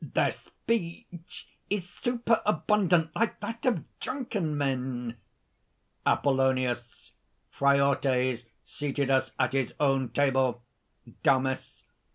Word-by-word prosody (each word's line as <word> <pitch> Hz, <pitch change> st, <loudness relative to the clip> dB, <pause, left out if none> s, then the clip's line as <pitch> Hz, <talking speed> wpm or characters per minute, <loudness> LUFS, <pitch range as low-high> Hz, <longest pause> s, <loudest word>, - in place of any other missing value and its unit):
"Their -, -, +4 dB
speech 175 Hz, -4 st, -5 dB, 0.2 s
is 195 Hz, -3 st, -1 dB
superabundant, 210 Hz, -6 st, +1 dB
like 230 Hz, 0 st, 0 dB
that 230 Hz, +2 st, -4 dB
of 215 Hz, -, +2 dB, 0.2 s
drunken 210 Hz, -, -2 dB
men!" 125 Hz, -4 st, -2 dB, 0.9 s
APOLLONIUS. 130 Hz, -3 st, +1 dB, 0.4 s
"Phraortes 135 Hz, -3 st, +2 dB, 0.2 s
seated 140 Hz, -2 st, -2 dB
us 130 Hz, -1 st, +2 dB
at 130 Hz, 0 st, +1 dB
his 135 Hz, -3 st, 0 dB
own 135 Hz, -3 st, +2 dB
table." 130 Hz, -1 st, +1 dB, 0.6 s
DAMIS. 130 Hz, -3 st, +1 dB
140 Hz, 90 wpm, -28 LUFS, 130-180 Hz, 0.9 s, Their